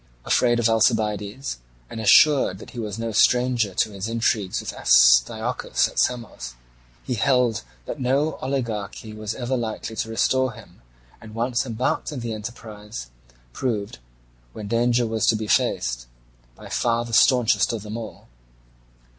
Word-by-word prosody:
Afraid 120 -1 +3
of 120 - +3
Alcibiades, 110 - 0 0.3
and 110 - -7
assured 130 -1 +5
that - - -12
he 120 - -8
was 105 -2 -4
no 115 0 -3
stranger 120 -2 +2
to 110 - +1
his 100 +1 -5
intrigues 115 -4 0
with - - -6
Astyochus - - +3
at - - -4
Samos, 105 - -2 0.5
he 125 - -3
held 125 -1 +2 0.2
that - - -6
no 140 +4 0
oligarchy 110 -5 -4
was 110 0 -5
ever 125 +1 -2
likely 115 -1 -4
to 110 - -2
restore 130 +3 +1
him, 100 - -16 0.4
and 110 0 -12
once 120 +2 -1
embarked 120 +6 -2
in 135 -5 -5
the 115 -1 -4
enterprise, 105 - -8 0.4
proved, 105 - -3 0.5
where 110 - -8
danger 120 +3 +1
was 110 -2 -1
to 115 - +4
be 110 0 -3
faced, - - 0 0.5
by - - -12
far 120 0 0
the 115 - -9
staunchest 125 +1 +4
of 115 -3 -5
them 105 0 -7
all. 115 -2 -8
115 Hz, 150 wpm, -23 LUFS, 105-120 Hz, 0.5 s, assured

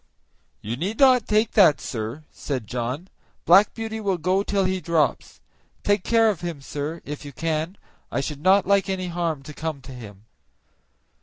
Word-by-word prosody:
"You 115 +3 -3
need 195 - -3
not 255 -4 +5
take 215 +1 +2
that, 175 -9 +5
sir," 115 +5 -5
said 130 -6 -4
John; 125 - -4 0.4
"Black 195 +4 +6
Beauty 220 -1 -4
will 195 -3 0
go 185 +4 +1
till 200 -1 0
he 185 0 -1
drops. 155 -4 0 0.4
Take 205 -2 +2
care 225 -1 +4
of 190 - -7
him, 170 -4 -4
sir, 145 +4 -5
if 150 0 -6
you 145 - -8
can; 160 +4 -2 0.3
I - - -1
should 145 +1 -4
not 190 +3 +4
like 200 0 +2
any 185 -1 -2
harm 170 -5 -2
to 150 - -9
come 155 -1 -4
to 130 +1 -11
him." 105 -4 -11
170 Hz, 175 wpm, -24 LUFS, 140-195 Hz, 0.4 s, Black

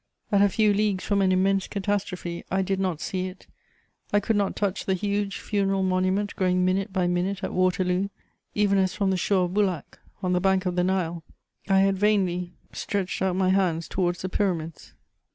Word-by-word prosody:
At 200 -1 +4
a 205 - +5
few 210 +1 +3
leagues 205 -2 0
from 200 -1 +1
an 190 -1 +3
immense 195 +1 +2
catastrophe, 195 -4 -3
I 190 +1 +1
did 195 0 -1
not 185 -5 -1
see 185 +1 -2
it, 185 - -11 0.7
I 205 - +4
could 220 +2 0
not 200 -1 0
touch 200 -2 -1
the 190 - +1
huge 200 +1 -1
funeral 195 -2 0
monument 185 +2 0
growing 180 -1 +2
minute 190 +1 0
by 185 -2 0
minute 180 +3 -1
at - - -3
Waterloo, 185 +1 +1 0.5
even 200 -1 +3
as 190 -1 +1
from 195 -2 +1
the - - +1
shore 185 0 +2
of 175 - -5
Bulak, 195 -5 -1 0.2
on 180 0 +1
the 180 - +1
bank 190 0 +2
of 180 -1 -1
the 180 - +2
Nile, 175 -3 -1 0.5
I 195 0 +5
had 195 -1 +2
vainly 185 -4 +1 0.2
stretched 195 -3 -3
out 190 -1 +1
my 185 0 +2
hands 180 -4 +1
towards 175 -2 -1
the 185 - -2
Pyramids. 170 -5 -2
190 Hz, 195 wpm, -25 LUFS, 180-200 Hz, 0.7 s, a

